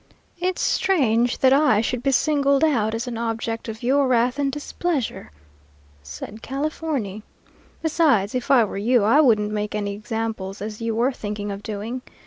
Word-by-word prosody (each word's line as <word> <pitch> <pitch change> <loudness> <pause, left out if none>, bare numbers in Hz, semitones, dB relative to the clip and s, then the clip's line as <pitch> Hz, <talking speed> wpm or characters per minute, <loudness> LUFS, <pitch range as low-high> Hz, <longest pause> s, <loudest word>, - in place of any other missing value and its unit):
"'It's 365 0 -1
strange 245 - +2
that 260 0 +4
I 275 -7 +4
should 235 +2 -1
be 275 - +1
signaled 280 0 +2
out 225 -8 +2
as 230 +2 -3
an 235 -2 -5
object 230 0 -3
of 220 +2 -7
your 270 +2 +3
wrath 250 +2 +2
and 280 -1 +1
displeasure,' 295 - -3 0.7
said 70 - -9
Californy. 275 -7 -3 0.6
'Besides, 290 - +2
if 250 -1 -3
I 255 -4 +6
were 205 - -4
you, 235 +2 +3
I 235 +9 +5
wouldn't 215 -6 +3
make 210 0 -3
any 205 -1 -2
examples 210 -2 -4
as 210 +2 -6
you 230 -1 -1
were 240 +4 +2
thinking 205 -4 -5
of 200 0 -6
doing. 220 +4 -5
235 Hz, 165 wpm, -23 LUFS, 210-275 Hz, 0.7 s, I